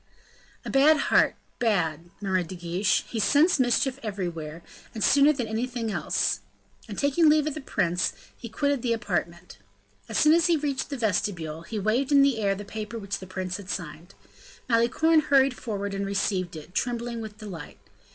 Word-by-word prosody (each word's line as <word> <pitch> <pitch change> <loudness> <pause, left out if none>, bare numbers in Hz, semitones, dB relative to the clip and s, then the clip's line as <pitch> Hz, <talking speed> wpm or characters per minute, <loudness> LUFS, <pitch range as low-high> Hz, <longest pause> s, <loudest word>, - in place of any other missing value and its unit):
"A - - -4
bad 295 +3 +5
heart, - - +3 0.2
bad!" 175 -8 0
murmured 185 -3 0
De 185 - -7
Guiche; 180 +3 0
"he 230 - -4
scents 290 - +4
mischief 255 +2 +1
everywhere, 170 -6 -5 0.3
and 220 - -2
sooner 285 +1 +5
than 255 -6 -3
anything 230 0 -3
else." - - 0 0.5
And 205 - -6
taking 300 +3 +3
leave 300 -1 +4
of 305 - -2
the 305 - -6
prince, 180 -8 0 0.2
he 235 - -9
quitted 285 +3 0
the 235 -1 +1
apartment. 175 - -4 0.5
As - - -2
soon 305 +1 +6
as 340 +1 +4
he 340 -2 +3
reached 285 -3 -2
the 280 - -4
vestibule, 180 -8 -1
he 215 +6 -6
waved 230 +7 0
in 280 -1 +6
the 275 -5 +2
air 200 -1 +1
the 205 +1 -8
paper 215 +2 -6
which 200 -3 -4
the 190 - -10
prince 185 0 -4
had 200 -2 -11
signed. 170 - -6 0.5
Malicorne 250 +7 +3
hurried 275 -3 +3
forward, 200 -4 -4
and 195 0 -2
received 190 -3 -1
it, 155 +3 -10
trembling 235 +1 -2
with 215 -1 -8
delight. 195 -8 -9
215 Hz, 180 wpm, -26 LUFS, 185-270 Hz, 0.5 s, soon